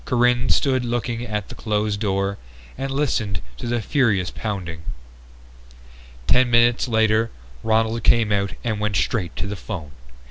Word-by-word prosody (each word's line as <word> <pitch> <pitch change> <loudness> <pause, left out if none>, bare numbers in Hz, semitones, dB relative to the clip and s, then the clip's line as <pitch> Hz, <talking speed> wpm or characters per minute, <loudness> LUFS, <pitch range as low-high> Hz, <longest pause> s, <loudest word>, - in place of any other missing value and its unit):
Corinne 125 0 +2
stood 130 -3 +2
looking 120 0 -2
at 105 -2 -3
the - - -7
closed 105 -1 -1
door 100 -1 -1 0.4
and 135 +1 -3
listened 120 - 0 0.2
to - - -5
the 120 -1 -1
furious 105 - +2
pounding. 90 -7 -4 1.4
Ten 125 - +4
minutes 120 +1 +4
later 110 -1 +3 0.3
Ronald 110 +1 +1
came 115 -3 +4
out 100 -1 0
and 110 -3 -1
went 105 -1 -1
straight 90 -3 0
to - - -3
the 100 +1 -4
phone. 90 -6 -6
110 Hz, 145 wpm, -22 LUFS, 100-120 Hz, 1.4 s, Ten